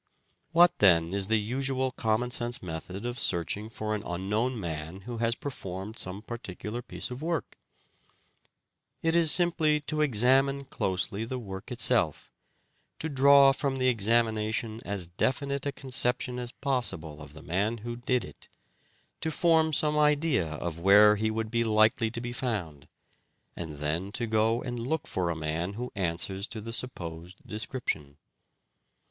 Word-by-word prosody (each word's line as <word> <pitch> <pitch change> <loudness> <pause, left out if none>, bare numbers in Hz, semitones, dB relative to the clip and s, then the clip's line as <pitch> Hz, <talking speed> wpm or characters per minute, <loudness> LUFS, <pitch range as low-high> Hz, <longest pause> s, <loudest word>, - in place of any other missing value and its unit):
What 170 +1 +5
then 85 -3 +5
is 100 -1 0
the 110 0 +3
usual 130 +4 -1
common 115 +1 0
sense 120 -2 -1
method 90 +5 -6
of 120 +1 -3
searching 100 +2 0
for 110 -1 -3
an 105 - -2
unknown 105 +8 -1
man 80 0 -5
who 115 +3 -6
has 115 0 +1
performed 100 -6 -6
some 95 +3 -2
particular 115 0 -6
piece 125 - -6
of 125 +3 -6
work? 165 0 -3 1.4
It 165 0 +2
is 165 -3 +5
simply 165 -4 +3
to 155 +1 -2
examine 135 +2 +3
closely 100 -6 -2
the 130 +3 -4
work 95 -5 -8
itself, - - +1 0.7
to 160 - -4
draw 140 0 +7
from 135 -1 -1
the 130 0 +3
examination 110 -1 +1
as 100 -3 -3
definite 140 +10 -1
a - - 0
conception 125 -2 -1
as 120 -1 -5
possible 120 - -2
of 75 -1 -11
the 80 - -12
man 100 +7 0
who 120 0 -3
did 125 0 0
it, - - -14 0.7
to 160 - -2
form 160 0 +3
some 150 0 +2
idea 150 - +3
of 85 +2 -4
where 105 +3 +7
he 110 +1 0
would 110 0 -3
be 115 0 +2
likely 110 +1 +3
to 115 - -3
be 120 0 -5
found, 90 - -4 0.7
and 80 -3 -6
then 80 +7 -2
to 120 0 -1
go 110 +1 +1
and 120 -2 -4
look 140 +6 -2
for 90 -2 -1
a 85 - -1
man 80 +4 -3
who 125 +4 -5
answers 95 +2 -2
to 115 - -7
the 115 +2 -7
supposed 90 -7 -6
description. 105 - -4
115 Hz, 155 wpm, -28 LUFS, 95-130 Hz, 1.4 s, draw